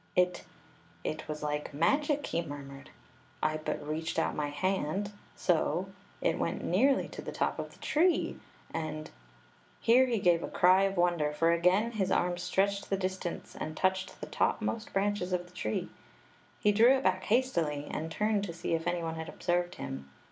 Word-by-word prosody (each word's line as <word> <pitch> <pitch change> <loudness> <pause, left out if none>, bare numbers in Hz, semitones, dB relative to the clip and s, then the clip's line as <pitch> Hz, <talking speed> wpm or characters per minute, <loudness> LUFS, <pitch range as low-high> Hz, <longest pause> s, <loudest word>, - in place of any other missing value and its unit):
"It 180 0 +2 0.3
— - - -29
it 155 0 -4
was 150 0 -5
like 150 -1 -3
magic!" 285 - +2
he 170 - -1
murmured. 140 -3 -8 0.5
"I 155 - +2
but 155 -1 -4
reached 160 +2 -2
out - - +1
my 150 -1 -1
hand 185 +4 -1
— - - -29
so - - +2 0.2
— - - -29
it - - +1
went - - -1
nearly 265 +10 +3
to - - -7
th© - - -6
top - - 0
of - - -5
the - - -17
tree, 340 +3 +2 0.3
and 155 -1 -4 0.2
— - - -29
" - - -31
Here 255 +3 +5
he 235 -2 +1
gave 175 -4 +3
a - - -3
cry 185 +2 +5
of 195 -1 -1
wonder, 175 -4 +2
for 165 +3 +2
again 180 +7 +3
his 200 -5 0
arm 175 0 +1
stretched 195 +3 0
the 195 - +1
distance 185 -2 -4
and 155 0 -5
touched 190 0 0
the - - -3
topmost 225 - -1
branches 195 -2 0
of 175 -1 0
the 175 - -18
tree. 110 -10 -2 0.7
He 210 - +4
drew 235 +6 +6
it 265 - -4
back 185 0 +1
hastily, 170 - +1
and 160 +1 -3
turned 210 +2 +1
to 170 - -6
see 165 - -3
if 165 0 -1
any 175 -1 0
one 165 0 -2
had 160 0 -5
observed 175 0 -1
him. 70 +1 -6
175 Hz, 195 wpm, -31 LUFS, 155-200 Hz, 0.7 s, drew